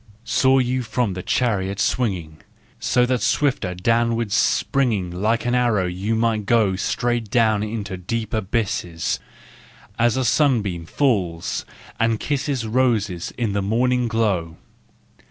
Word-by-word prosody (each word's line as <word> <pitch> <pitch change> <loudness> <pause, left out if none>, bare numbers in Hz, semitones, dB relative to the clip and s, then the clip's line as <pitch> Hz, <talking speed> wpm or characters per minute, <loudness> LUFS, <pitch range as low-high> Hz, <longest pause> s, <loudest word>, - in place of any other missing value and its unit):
Saw 130 0 +3
you 130 0 +1
from 115 -3 -1
your 90 - -5
chariot 100 -4 0
swinging, 90 -9 -1 0.4
So 125 - +2
that 125 -1 0
swifter 125 -11 0
downward 115 +3 +1
springing 105 -4 +1
Like 110 +6 0
an 120 - +1
arrow 120 -6 +2
you 95 +5 -2
might 110 -2 0
go 110 -5 +3
Straight 120 +3 -1
into 110 -2 +1
the 90 - -14
deep 115 +4 -3
abysses, 95 -5 -1 0.8
As 120 +1 +3
a 130 - 0
sunbeam 105 - +1
falls 95 - 0 0.3
and 115 -1 +2
kisses 140 -4 -2
Roses 110 -7 0
in 115 -4 -1
the 100 - 0
morning 120 +4 +1
glow. 100 -8 -1
110 Hz, 130 wpm, -22 LUFS, 95-120 Hz, 0.8 s, Saw